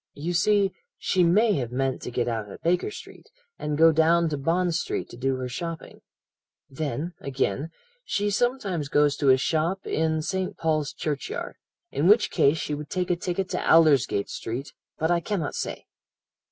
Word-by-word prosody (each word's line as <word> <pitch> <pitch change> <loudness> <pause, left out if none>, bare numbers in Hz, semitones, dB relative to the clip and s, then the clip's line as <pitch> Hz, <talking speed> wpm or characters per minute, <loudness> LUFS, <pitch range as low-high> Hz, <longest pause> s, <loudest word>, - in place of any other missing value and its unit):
You 165 +5 -3
see, 200 +2 +3 0.3
she 185 - +1
may 205 +6 +4
have 120 -2 -4
meant 135 +1 -1
to - - -5
get 120 0 -1
out 110 -3 -3
at - - -12
Baker 180 - +1
Street, - - -12 0.3
and 150 -1 -2
go 165 +1 +7
down 165 +1 +3
to 150 - -2
Bond 170 +4 +1
Street - - -2
to - - -10
do 130 +2 0
her 130 0 -4
shopping. 165 +6 -6 0.7
Then, 155 +4 -4
again, 135 +1 -2 0.3
she 205 - -1
sometimes 200 - -1
goes 145 -1 +3
to 140 - +2
a 130 - +7
shop 165 +7 -1
in 160 0 0
St. 190 +2 -2
Paul's 155 -3 0
Churchyard, 145 -3 -4 0.3
in 150 - +1
which 210 +3 +5
case 145 +3 +3
she 150 - -3
would 150 0 -5
take 180 0 -1
a - - +3
ticket 180 +2 -2
to - - -2
Aldersgate 145 -10 +4
Street; 125 +5 -5 0.2
but 160 +2 0
I 175 - +3
cannot 170 -4 -3
say.' - - -4
160 Hz, 180 wpm, -26 LUFS, 140-180 Hz, 0.7 s, go